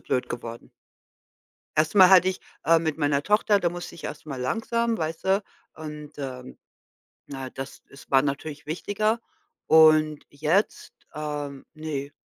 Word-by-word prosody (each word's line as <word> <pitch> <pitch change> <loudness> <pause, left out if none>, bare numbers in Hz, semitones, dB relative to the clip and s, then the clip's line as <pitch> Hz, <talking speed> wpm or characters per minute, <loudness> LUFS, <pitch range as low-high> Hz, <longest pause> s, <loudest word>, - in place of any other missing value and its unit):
blöd 125 - -1
geworden. 115 -1 -7 1.1
Erst 155 +3 +2
mal 190 -2 +8
hatte 185 -1 +7
ich, 185 - -3 0.2
äh 165 +2 +5
mit 160 -1 -2
meiner 145 -2 +1
Tochter, 210 +3 +3
da 175 - +1
musste 175 0 -7
ich 170 - -12
erst 150 - -7
mal 135 -4 -5
langsam, 225 - 0
weißt 160 0 -3
du? 195 +2 +2 0.3
Und, 150 -1 -8
ähm, 130 -2 -7 0.7
na, 135 -2 -6
das 135 +1 -8
es 140 - -15
war 135 -1 +6
natürlich 145 +1 -4
wichtiger 215 +8 -1 0.5
und 155 -1 +5
jetzt, 155 +8 0 0.2
ähm, 145 -2 -5
ne 145 -3 -5
155 Hz, 145 wpm, -25 LUFS, 140-180 Hz, 1.1 s, mal